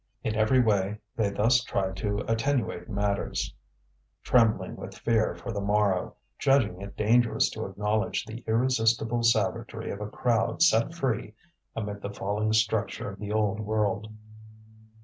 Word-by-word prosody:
In 110 - -1
every 110 +4 +3
way 105 -3 +2 0.2
they 110 -3 +1
thus 115 +5 +3
tried 95 -5 -2
to 105 -1 -2
attenuate 115 -6 -1
matters, 100 -1 -1 0.7
trembling 115 -3 +2
with - - -9
fear 110 -2 +1
for - - -6
the 100 -2 -3
morrow, 100 -2 +1 0.2
judging 125 -10 +2
it 100 0 -9
dangerous 115 +2 +3
to - - -4
acknowledge 105 +4 -1
the 115 +2 -8
irresistible 115 0 +2
savagery 115 0 0
of 100 - -6
a 105 - -4
crowd 115 +7 +1
set 155 0 +3
free 115 -8 -2 0.4
amid 105 -2 -4
the 100 - -4
falling 105 +2 -2
structure 110 -2 0
of 100 - -12
the 105 0 -5
old 105 -1 +1
world. 105 0 -1
110 Hz, 145 wpm, -27 LUFS, 100-115 Hz, 0.7 s, every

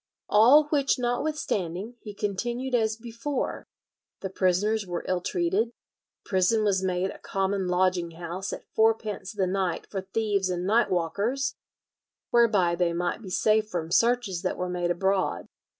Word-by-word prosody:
"All 245 +9 +7
which 280 -3 +2
notwithstanding, 240 - -2
he 210 -2 -9
continued 240 +6 -3
as 220 -2 +2
before:... 235 +4 -4 0.5
the 190 - -4
prisoners 200 +3 +1
were 175 -1 -4
ill 185 -1 0
treated, 185 +5 0
the 235 - -20 0.5
prison 190 +4 +2
was 195 -3 +2
made 185 0 0
a - - -12
common 195 -1 -1
lodging 180 -1 +1
house 175 +3 -5
at - - -7
fourpence 220 -3 +1
the 200 -3 0
night 185 -2 -1
for 195 - -2
thieves 200 0 -1
and 180 0 -2
night 225 +5 +3
walkers, 205 +10 0 0.8
whereby 210 -7 +4
they 170 0 +1
might 175 +5 -2
be 200 - -8
safe 215 +3 +2
from 165 -3 -4
searches 230 -5 +2
that - - -2
were 180 0 -2
made 175 -1 -1
abroad." 190 +2 0
195 Hz, 150 wpm, -27 LUFS, 180-225 Hz, 0.8 s, All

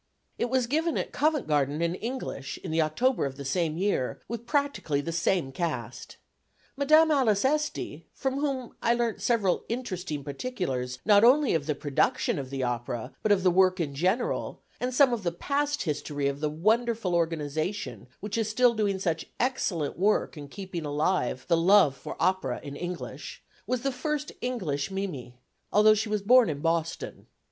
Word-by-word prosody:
It 240 - 0
was 260 -1 +2
given 315 +6 0
at - - -3
Covent 300 -2 +1
Garden 145 -1 +1
in 170 0 0
English, 225 - -5
in - - -4
the 160 +1 +2
October 235 +12 +1
of 135 -1 -8
the 140 - -7
same 160 +2 0
year, 185 -9 0
with 235 0 -6
practically 280 - 0
the 165 +4 -3
same 170 -3 0
cast. 170 +5 -4 0.6
Madame 310 +3 +5
Alice 245 -7 +3
Esty, 300 +2 -1
from 270 0 -2
whom 270 -4 -2
I 235 - +3
learnt 235 -2 -1
several 210 -7 +1
interesting 185 - -4
particulars, 140 - -3
not 205 -1 +6
only 265 +3 +5
of 160 -3 -1
the 150 - 0
production 145 0 0
of 135 -2 -6
the 135 -1 -3
opera, 120 +1 -3
but 215 - +1
of 195 -2 +3
the 185 - +5
work 185 +1 +4
in 150 -4 -2
general, 185 - -1 0.2
and 250 +1 -1
some 255 0 +5
of 235 - -2
the 175 -3 -1
past 290 +10 -1
history 145 -3 -2
of 140 0 -2
the 150 0 0
wonderful 220 +4 +1
organisation 165 +2 -2
which 210 +2 -3
is 220 -1 0
still 245 +2 +4
doing 205 -3 0
such 165 -4 -2
excellent 185 - -1
work 205 0 +2
in 145 -2 -8
keeping 185 +1 -6
alive 145 -3 0
the 170 - +4
love 175 -4 +5
for - - -8
opera 185 -10 +1
in 140 -1 -7
English, 175 +3 -6 0.2
was 255 -1 -1
the 275 - +1
first 295 +3 -3
English 175 - -2
Mimi, 170 -11 -5 0.3
although 215 +1 +6
she 215 +1 -1
was 210 -1 -1
born 245 0 +6
in 145 -2 -3
Boston. 165 +1 -2
190 Hz, 175 wpm, -28 LUFS, 150-240 Hz, 0.6 s, not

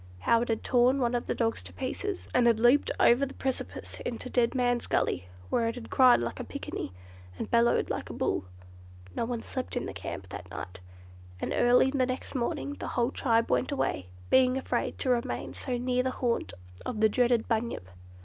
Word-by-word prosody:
How 230 0 +4
it 240 - -2
had 225 - -1
torn 250 +2 +3
one 245 -2 +1
of 240 - -1
the - - -1
dogs 225 -1 0
to - - -9
pieces, 375 +9 -4
and 245 -1 +4
had 230 -2 +4
leaped 240 +5 +5
over 240 +4 +5
the 275 - -3
precipice 265 -1 -4
into 245 +1 -5
Dead 240 0 +2
Man's 245 -1 +1
Gully, 90 +1 0 0.2
where 230 - +2
it 230 - -2
had 245 -2 -9
cried 255 - +6
like 115 - -4
a - - -3
picaninny, - - -5 0.5
and - - -5
bellowed 235 0 +3
like - - -4
a - - -6
bull. - - -1 0.7
No - - 0
one 235 -1 -3
slept 255 -1 -4
in - - -2
the - - -5
camp - - -7
that - - -8
night, 95 +1 -7 0.6
and - - -2
early 250 +2 +5
the 260 -2 +1
next 255 0 -4
morning 285 +3 -2
the - - -4
whole 240 +1 +2
tribe 230 -4 +1
went 260 - +1
away, 95 - -1 0.2
being 255 0 +5
afraid 265 - -2
to 260 - 0
remain 240 -1 -1
so 250 -2 -3
near 250 +1 +1
the 260 - 0
haunt 245 -2 -1 0.3
of 235 -4 -4
the 220 - +6
dreaded 240 +1 +2
"Bunyip." 225 - -1
245 Hz, 205 wpm, -29 LUFS, 230-255 Hz, 0.7 s, cried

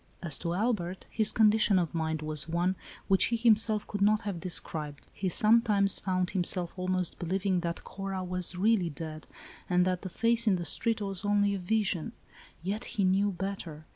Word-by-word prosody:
As 155 -5 -2
to 170 0 -2
Albert, 190 -4 -2
his 220 -1 +1
condition 215 -2 +4
of 170 -4 -1
mind 160 -1 -2
was 155 0 -3
one, 175 +3 0 0.3
which 190 -1 +5
he 235 - 0
himself 220 -2 +4
could 205 - -5
not 210 +1 +3
have 200 -4 -4
described. 155 -4 -4
He 190 - -2
sometimes 210 0 +3
found 185 -2 -1
himself 180 -2 0
almost 185 -1 -1
believing 185 +2 0
that 170 -1 -4
Cora 195 -1 -5
was 180 0 -1
really 195 -2 +2
dead, 155 +1 -7 0.4
and 180 0 +3
that 185 -1 -1
the 190 - -6
face 230 +4 +3
in 200 - +4
the 175 -1 -4
street 225 +5 -2
was 195 -3 -4
only 205 0 +2
a 195 - -3
vision: 195 -3 -1 0.5
yet 205 +6 -3
he 200 - +2
knew 195 +2 +2
better. 180 -5 -6
190 Hz, 180 wpm, -29 LUFS, 175-210 Hz, 0.5 s, which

